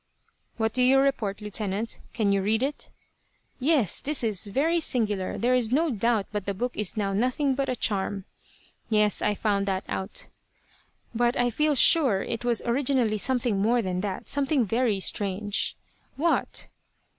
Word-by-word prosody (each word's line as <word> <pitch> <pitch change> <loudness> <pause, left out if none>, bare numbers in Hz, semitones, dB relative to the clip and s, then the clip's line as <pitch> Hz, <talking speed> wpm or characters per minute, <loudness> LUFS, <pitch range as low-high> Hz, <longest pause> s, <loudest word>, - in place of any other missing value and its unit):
"What 220 -1 0
do 255 - +1
you 260 +2 +5
report, 235 -7 0
Lieutenant? 210 +1 -3
Can 210 -3 0
you 200 0 +2
read 220 +5 +1
it?" 285 +2 -4 0.7
"Yes. 265 - +3
This 295 -2 -2
is 210 -3 +1
very 310 +11 +1
singular. 210 - 0
There 245 +2 +1
is 240 -3 +1
no 310 +4 +2
doubt 225 -2 +1
but 210 -2 -4
the 200 - -2
book 245 +5 -3
is 210 +1 -1
now 200 -2 -1
nothing 255 +6 +1
but 270 0 -2
a 255 - 0
charm." 200 -3 -2 0.6
"Yes. 210 -2 +2
I 210 - +1
found 200 -1 0
that 190 0 -1
out." 190 - -4 0.9
"But 240 +1 +1
I 245 0 +2
feel 300 +5 +1
sure 260 -8 +4
it 230 0 -4
was 240 -2 +1
originally 245 -3 +1
something 245 -4 0
more 235 +3 +2
than 185 -1 -2
that. 195 -2 -4
Something 275 -2 +1
very 225 -1 0
strange." 200 +1 -2 0.4
"What?" 330 +4 0
225 Hz, 165 wpm, -26 LUFS, 205-255 Hz, 0.9 s, you